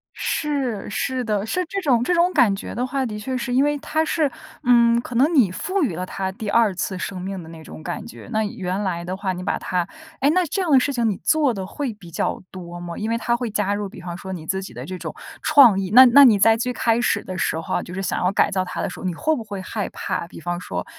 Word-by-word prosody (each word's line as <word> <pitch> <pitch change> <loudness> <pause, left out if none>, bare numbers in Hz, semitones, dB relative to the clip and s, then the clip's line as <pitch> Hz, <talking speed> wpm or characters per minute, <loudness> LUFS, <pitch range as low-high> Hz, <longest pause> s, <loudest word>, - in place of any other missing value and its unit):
是， 270 -10 -2
是 255 +4 -2
的， 210 -2 -1
是 365 +11 -1
这 395 +1 -3
种 245 -7 +2
这 355 - +1
种 345 +2 +3
感 205 -5 +4
觉 195 - -7
的 245 +2 -1
话， 270 0 -1
的 210 -3 -5
确 255 +5 -3
是 245 0 -3
因 265 +2 +4
为 295 0 +1
它 315 +2 -1
是 305 -3 0 0.3
嗯， 235 -1 +5
可 245 - -8
能 280 +8 +3
你 220 -10 +5
赋 370 - -1
予 200 - -1
了 180 - -3
它 190 0 -3
第 205 +1 -6
二 225 -3 +3
次 185 +1 -3
生 185 0 -5
命 190 0 -5
的 160 - -12
那 160 -1 -11
种 155 - -11
感 175 +1 -5
觉。 235 - -11
那 220 0 +1
原 195 -1 -3
来 175 -3 -2
的 185 +1 -3
话 190 -1 -2
你 180 0 -6
把 - - -1
它 180 -2 -1 0.3
诶， 280 - +4
那 365 +2 +3
这 360 +6 -2
样 350 -4 -1
的 270 - +7
事 280 - 0
情 240 -4 0
你 200 - -2
做 295 -6 +3
得 190 -2 -4
会 275 -1 -4
比 195 -5 -14
较 165 - -2
多 175 -2 -8
吗？ 175 -1 -7
因 215 +1 -3
为 230 - +1
它 235 +1 0
会 240 -2 -3
加 205 -1 0
入 205 0 -3
比 195 - -11
方 175 -1 -6
说 190 +1 -7
你 160 -3 -7
自 190 0 -1
己 190 - -9
的 - - -7
这 185 - -6
种 - - -6 0.3
创 245 -9 +6
意， 190 -1 -3
那 260 +2 +10
那 280 +4 +8
你 220 -5 +5
在 225 +2 +5
最 250 +2 -2
开 230 -1 +1
始 240 - +1
的 185 - -6
时 160 - 0
候 165 - -3
啊， - - -1
就 180 - -9
是 190 - -3
想 195 - -1
要 180 - +2
改 - - +3
造 190 -1 0
它 180 - -5
的 - - -1
时 - - -9
候， - - -7
你 180 - -1
会 315 - 0
不 240 - -5
会 200 -3 -6
害 205 +2 -3
怕， 170 - -4
比 - - -11
方 175 +1 -3
说 180 - -5
215 Hz, 305 characters per minute, -22 LUFS, 185-255 Hz, 0.3 s, 那